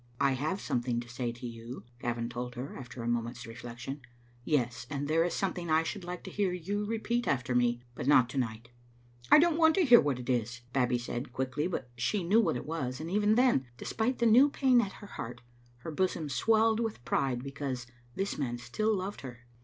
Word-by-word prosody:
"I 140 - +4
have 150 +9 -1
something 120 -5 -1
to 120 - -11
say 120 0 -3
to 120 +2 -9
yon," 115 0 -8 0.2
Gavin 120 -1 -2
told 125 +1 -5
her, 130 +4 -6
after 120 -2 -8
a - - -3
moment's 120 +1 -2
reflection; 120 +4 -7 0.4
"yes, 125 -5 0
and 145 -1 -3
there 160 +2 +3
is 175 -1 -1
some« 195 - 0
thing 170 -2 -5
I 160 +1 +4
should 195 +3 -4
like 175 0 -6
to - - -8
hear 200 -3 0
you 200 +4 -2
repeat 235 +2 -1
after 125 -2 0
me, 120 0 +2
but 125 - -5
not 130 -4 +6
to 135 - -2
night." 115 -1 -3 0.3
" 120 0 -24
I - - +10
don't 335 +1 +4
want 320 -1 +6
to 375 - +3
hear 245 -4 +8
what 145 -4 0
it 125 -1 -8
is," 120 -1 -1
Babbie 125 -2 +2
said, 120 +2 -5
quick 130 +1 -3
ly, 150 +3 +1
but 130 -9 -4
she 175 - 0
knew 205 +7 +4
what 165 - +1
it - - -6
was, 135 -5 -3
and 160 +2 -5
even 210 +2 +3
then, 240 - +3
despite 230 - -1
the 235 - +1
new 245 +6 +7
pain 260 -3 +4
at 200 -3 -4
her 205 - -11
heart, 125 - -7 0.4
her 160 - -5
bosom 165 -2 -1
swelled 220 - +3
with 220 - -3
pride 125 -1 0
because 135 -3 -4 0.3
this 195 -3 -2
man 120 -4 -1
still 215 - 0
loved 190 +2 -5
her. 125 -2 -10
135 Hz, 225 wpm, -31 LUFS, 120-195 Hz, 0.4 s, I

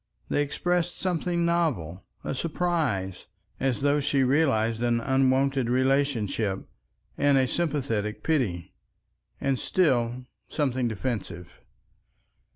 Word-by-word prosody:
They 145 - +2
expressed 175 +4 -1
something 175 -1 0
novel—a 135 - -2
surprise, 150 - -1 0.3
as 135 -2 0
though 145 +1 +3
she 140 -1 +1
realized 125 -5 +2
an 120 -1 +2
unwonted 135 0 +2
relationship, 125 -6 +1 0.5
and 145 -1 +4
a 130 -1 +3
sympathetic 125 -10 -1
pity. 115 - -1 0.7
And 135 -2 0
still—something 130 -2 0
defensive. 105 -6 -4
130 Hz, 90 wpm, -27 LUFS, 115-150 Hz, 0.7 s, and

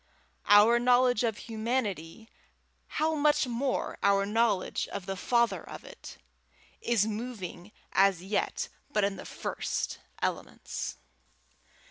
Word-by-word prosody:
Our 210 +3 +7
knowledge 245 -1 +4
of 225 -3 0
humanity, 220 -5 -3 0.7
how 315 +1 +2
much 300 -1 +3
more 250 +2 -2
our 200 0 +3
knowledge 210 -2 +1
of 200 -2 -6
the 195 - -3
Father 235 +4 +1
of - - -9
it, - - -11 0.6
is 230 -4 +2
moving 210 -4 -5 0.2
as 195 -3 +3
yet 200 +2 -1 0.2
but 210 -6 +1
in 200 0 0
the - - -8
first - - -3 0.2
elements. - - -4
220 Hz, 115 wpm, -29 LUFS, 200-245 Hz, 0.7 s, Our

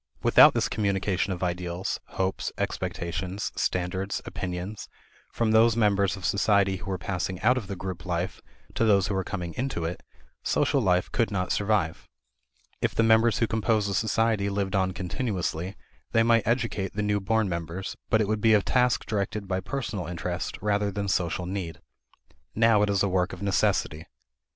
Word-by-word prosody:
Without - - +7
this - - +1
communication 100 -2 0
of 95 0 -3
ideals, 90 0 -2
hopes, 95 0 -2
expectations, 90 +2 -3
standards, 95 +2 -1
opinions, 90 +3 -5 0.4
from 115 -2 0
those 110 +1 +5
members 100 -3 +2
of 95 - -7
society 100 -1 +2
who 95 +2 -8
are 95 - -1
passing 90 0 -3
out 125 +3 +5
of 120 -6 -4
the 100 - -4
group 95 -1 -6
life 90 0 -3 0.3
to - - 0
those 100 -4 +4
who 100 - -2
are 95 - 0
coming 90 -3 -5
into 125 -10 -2
it, 85 +2 -4 0.4
social - - +1
life 90 -1 +1
could 115 - +1
not 90 -3 -2
survive. 100 -6 0 0.7
If - - 0
the 115 - +3
members 115 -1 +4
who 115 - +2
compose 110 -1 +1
a 100 - -2
society 110 0 +1
lived 100 0 -1
on 95 -1 +2
continuously, 95 - -3 0.4
they 115 - +5
might 115 -2 +3
educate 115 -5 -1
the 105 +1 -2
new 105 0 +1
born 110 +2 +1
members, 85 +1 -4
but 110 - +3
it 105 - +1
would 110 0 -1
be 110 0 +5
a 105 - +4
task 125 -2 +2
directed 100 -1 -2
by 95 0 -1
personal 100 -2 -4
interest 90 +1 -4
rather 105 -1 +1
than 100 0 -3
social 90 -1 0
need. 90 -3 -4 0.8
Now 115 -1 +4
it 105 - +2
is 100 -1 +2
a - - +2
work 90 -1 0
of 95 - -7
necessity. 95 -5 0
100 Hz, 175 wpm, -27 LUFS, 90-110 Hz, 0.8 s, Without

